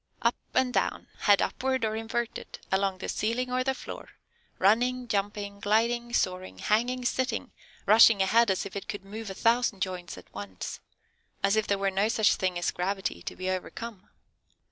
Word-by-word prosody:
Up - - +4 0.2
and 255 -1 +3
down, - - -1
head 205 -2 +5
upward 260 -2 0
or 215 0 -1
inverted, 225 +1 -4
along 190 0 +1
the - - -6
ceiling, 245 +4 -1
or 255 0 +1
the 265 0 0
floor, - - -8 0.5
running, 245 +5 +2
jumping, 205 -1 -2
gliding, 235 +3 +1
soaring, 185 -5 -1
hanging, 245 +4 0
sitting, 260 +1 -1 0.3
rushing 215 0 +7
ahead 220 +4 +4
as 190 - 0
if 195 - -8
it 200 - -5
could 200 -2 -6
move 215 +2 -7
a 195 - -6
thousand 230 -4 +2
joints 180 -2 -5
at - - -15
once, 100 -3 -6 0.6
as 200 +1 +4
if 220 -1 +1
there 200 - +2
were 195 0 0
no 195 +2 +2
such 220 -2 +3
thing 185 -2 -1
as 175 - 0
gravity 190 - -2
to - - -6
be 185 - -5
overcome." 195 +2 -6
210 Hz, 175 wpm, -28 LUFS, 195-235 Hz, 0.6 s, rushing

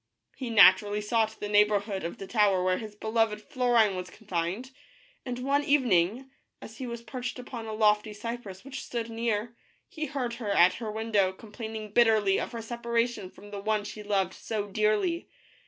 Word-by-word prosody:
He 255 -3 -5
naturally 205 0 +6
sought 220 +1 0
the 205 - -3
neighborhood 205 -1 +2
of 170 - -4
the 195 - -7
tower 200 -3 +3
where 185 0 +1
his 215 -2 -8
beloved 220 0 0
Florine 240 -5 +2
was 180 0 -5
confined, 195 +5 -4 0.6
and 245 -1 -3
one 275 +3 +1
evening, 250 -3 +2 0.3
as 225 - -11
he 260 - -4
was 235 -1 -6
perched 250 +2 -5
upon 245 -2 -7
a - - -4
lofty 210 0 +3
cypress 210 -2 -7
which 275 0 -6
stood 230 -1 -4
near, 230 0 -2 0.3
he 310 -1 -5
heard 255 -5 -3
her 210 - -3
at 180 -2 +5
her 220 -2 -3
window, 215 -3 +1
complaining 215 +1 -8
bitterly 215 -4 +4
of - - -4
her 230 -2 -6
separation 235 -3 -1
from 205 +2 -14
the 200 - -5
one 210 +1 0
she 210 +1 -7
loved 195 -3 0
so 215 -2 -3
dearly. 215 - 0
220 Hz, 175 wpm, -28 LUFS, 205-235 Hz, 0.6 s, naturally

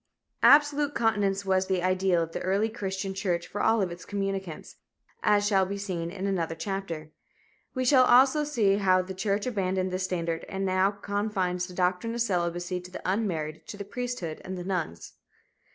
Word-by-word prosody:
Absolute 290 0 +5
continence 200 -3 +1
was 190 0 +2
the 185 -2 0
ideal 185 -2 +2
of 165 - -6
the - - -4
early 200 +4 +1
Christian 195 -3 -4
church 180 -3 -1
for 205 - -5
all 225 -2 +3
of 180 - -2
its 175 - -8
communicants, 195 -4 -4 0.4
as 205 -1 +3
shall 195 -2 +3
be 195 +2 -3
seen 180 -4 -3
in 190 +2 -5
another 170 -5 -1
chapter. 165 -3 -5 0.6
We 255 0 0
shall 255 0 +6
also 265 +5 +5
see 220 -10 +2
how 185 -2 +3
the 190 +1 -7
church 200 +2 -1
abandoned 190 -5 -1
this 185 0 -1
standard 170 -3 -2
and 195 0 -2
now 185 +1 +3
confines 200 -3 -2
the 180 - -11
doctrine 180 +5 0
of 235 - -1
celibacy 175 -2 -1
to 180 - -11
the 180 - -8
unmarried, 170 -6 -2
to 205 - -7
the 200 - -6
priesthood 240 -8 -4
and 190 0 -5
the 180 - -5
nuns. 175 - -4
190 Hz, 185 wpm, -27 LUFS, 180-205 Hz, 0.6 s, shall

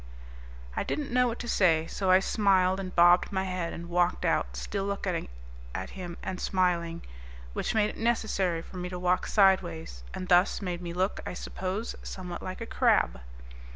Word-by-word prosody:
I - - 0
didn't 290 -4 -3
know 250 0 +4
what 235 0 -2
to 240 - -6
say, 165 -7 +3
so 190 +2 -2
I 185 +1 +6
smiled 190 -2 +3
and 185 -1 -6
bobbed 175 +2 +6
my 190 -1 0
head 185 -3 -3
and 170 0 -7
walked 175 0 +1
out - - 0
still 195 - -3
looking 195 -4 -2 0.5
at 95 - -4
him 175 -2 -7
and 185 -1 -4
smiling, 170 -3 0 0.5
which - - -2
made 215 -1 +3
it - - -13
necessary 195 -7 0
for 185 - -11
me 180 0 -4
to 180 - -5
walk 180 0 +1
sideways, 80 - +2
and 185 - -5
thus 180 +2 +4
made 180 -3 -4
me 175 -1 -5
look, 185 +3 -1
I - - -5
suppose, 190 +6 -4
somewhat 180 -2 -6
like 185 +4 -6
a - - -3
crab. - - +2
185 Hz, 185 wpm, -29 LUFS, 175-195 Hz, 0.5 s, I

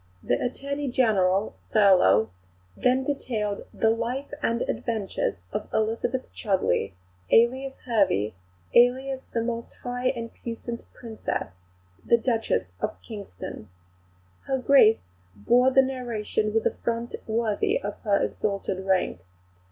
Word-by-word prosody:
The - - 0
Attorney 280 +3 -3
General, 205 -5 +2 0.2
Thurlow, 180 - +5 0.4
then 255 +1 +2
detailed 225 -7 -2
the 225 - +2
'Life 240 +5 -3
and 235 -2 +1
Adventures 215 - -2 0.2
of - - -4
Elizabeth 230 +4 -1
Chudleigh, 185 - 0 0.4
alias 260 +4 +3
Hervey, 195 - +1 0.4
alias 260 +2 +4
the 230 - 0
most 230 0 -4
high 245 0 -2
and 230 -3 -2
puissante 235 0 -6
Princess, 225 -3 -4 0.5
the 235 - +4
Duchess 225 - 0
of - - -3
Kingston.' 195 - -8 0.8
Her 270 - +1
Grace 250 -4 +5 0.3
bore 245 - +4
the 265 0 +5
narration 235 -5 -2
with 225 +1 0
a - - +3
front 235 0 -2
worthy 230 - +1
of - - -5
her 205 -3 +2
exalted 195 -2 -2
rank. 190 - +1
230 Hz, 120 wpm, -26 LUFS, 205-255 Hz, 0.8 s, Thurlow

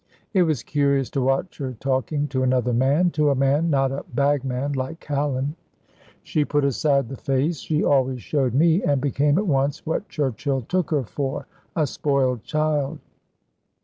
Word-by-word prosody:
It 190 - +4
was 155 -8 +1
curious 140 -2 +1
to 140 - -1
watch 135 +9 0
her 130 -2 -3
talking 135 +4 -1
to 130 -1 -1
another 125 -1 +1
man 140 +9 +3
to 150 -1 +2
a 140 - +2
man, 140 +5 +2
not 135 -3 +2
a 135 - -4
bagman 140 -1 0
like 135 +4 -4
Callan. 145 0 -2 0.7
She 150 - 0
put 145 -1 +1
aside 140 -1 +1
the 135 - -6
face 140 +4 0
she 155 0 -1
always 130 -3 +1
showed 130 -5 0
me 165 +5 +4
and 145 -2 +1
became 145 +2 +1
at 210 - +1
once 140 -3 0
what 165 +5 -2
Churchill 135 -1 -1
took 180 +8 -1
her 150 -4 +1
for 135 +3 -4 0.3
a 155 - +2
spoiled 135 -4 0
child. 155 -2 0
140 Hz, 170 wpm, -23 LUFS, 130-150 Hz, 0.7 s, It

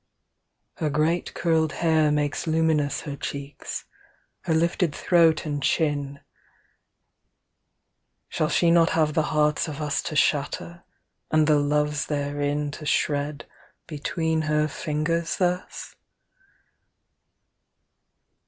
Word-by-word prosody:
II 165 - -2
Her - - +2
great 155 +4 0
curled 160 -2 +1
hair 160 -2 +2
makes 145 +1 -1
luminous 160 -2 +1
Her 145 -2 -6
cheeks, 140 0 -6 0.6
her 170 - +1
lifted 170 -1 +1
throat 165 -3 +3
and 145 -2 -3
chin 145 -2 0 2.1
Shall 155 - -1
she 170 0 +3
not 170 -1 +5
have 155 -1 +2
the 160 - +2
hearts 150 0 +1
of 150 -1 -6
us 150 -1 -1
To 155 - -5
shatter, 150 +4 0 0.5
and 155 -1 +3
the 150 -1 +4
loves 150 0 0
therein 145 0 -2
To 150 - -9
shred 145 0 -1 0.4
between 160 +1 -2
her 150 0 +2
fingers 155 +3 -2
thus? 180 0 -2
150 Hz, 110 wpm, -25 LUFS, 145-160 Hz, 2.1 s, not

